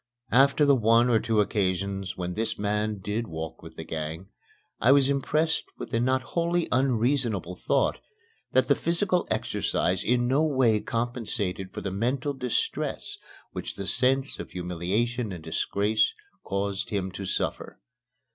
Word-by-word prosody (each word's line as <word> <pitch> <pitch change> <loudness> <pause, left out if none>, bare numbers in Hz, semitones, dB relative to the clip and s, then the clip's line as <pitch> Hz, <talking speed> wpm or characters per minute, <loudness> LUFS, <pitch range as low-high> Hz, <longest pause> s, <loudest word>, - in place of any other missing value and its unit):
After 140 +4 +5
the 140 - +6
one 115 0 +4
or 115 - +5
two 110 -2 +2
occasions 95 -1 -1
when 90 -1 -3
this 110 +4 -2
man 105 +1 -1
did 110 +4 -2
walk 80 -2 -6
with 80 0 -12
the 80 - -6
gang, 80 +3 -5 0.5
I 125 - +5
was 140 0 +5
impressed 155 +4 +1
with - - -7
the 115 - +1
not 130 +1 +1
wholly 170 0 +1
unreasonable 120 - +1
thought - - +1 0.5
that - - +3
the - - +6
physical 180 +1 +1
exercise 90 +1 0
in 120 0 +2
no 135 +4 +3
way 130 -8 +3
compensated 115 -6 -3
for - - -6
the 100 - -3
mental 125 +8 -1
distress 125 -3 -2 0.3
which - - -5
the 100 - -5
sense 130 +5 +1
of - - -6
humiliation 95 +7 -2
and 85 -3 -7
disgrace 105 +7 +1 0.3
caused 100 0 -2
him 95 -2 -2
to 95 +1 -6
suffer. - - -3
110 Hz, 150 wpm, -27 LUFS, 95-130 Hz, 0.5 s, the